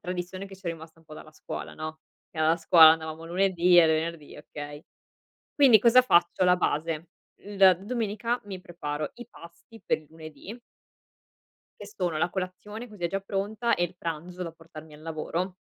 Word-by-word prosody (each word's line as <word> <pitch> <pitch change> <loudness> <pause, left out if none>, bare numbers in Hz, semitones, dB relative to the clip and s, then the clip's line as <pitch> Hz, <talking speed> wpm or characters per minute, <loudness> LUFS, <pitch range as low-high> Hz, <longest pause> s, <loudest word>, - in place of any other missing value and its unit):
tradizione 180 +2 -5
che 195 -1 -12
ci 190 - -24
è - - 0
rimasta 160 0 -11
un 165 - -23
po' 155 -1 -12
dalla 155 - -12
scuola 155 - -8
no? 155 0 -7 0.3
Che - - -20
alla 160 +1 +3
scuola 165 -1 +7
andavamo 160 0 -2
lunedì 180 0 +3
e 165 - +7
venerdì, 160 -1 -2
okay. 145 0 -9 0.7
Quindi 265 -7 +7
cosa 240 +3 +6
faccio 175 -5 +3
la 180 0 +5
base? 160 -1 -2 0.4
L 195 -2 +5
domenica 230 +2 -2
mi 190 -3 -8
preparo 150 -4 -5
i 240 - -11
pasti 170 +5 -16
per - - +1
il 155 - -19
lunedì. 160 +6 -10 1.3
Che 205 - -8
sono 180 -6 -3
la 165 - +1
colazione, 190 +6 -6
così 205 -5 -8
è - - +4
già 195 +3 -3
pronta, 205 +4 -1
e 175 - +1
il 175 - -7
pranzo 175 +2 -6
da 170 - -5
portarmi 160 -1 -14
al 150 - -14
lavoro. 165 +3 -4
175 Hz, 180 wpm, -27 LUFS, 160-195 Hz, 1.3 s, scuola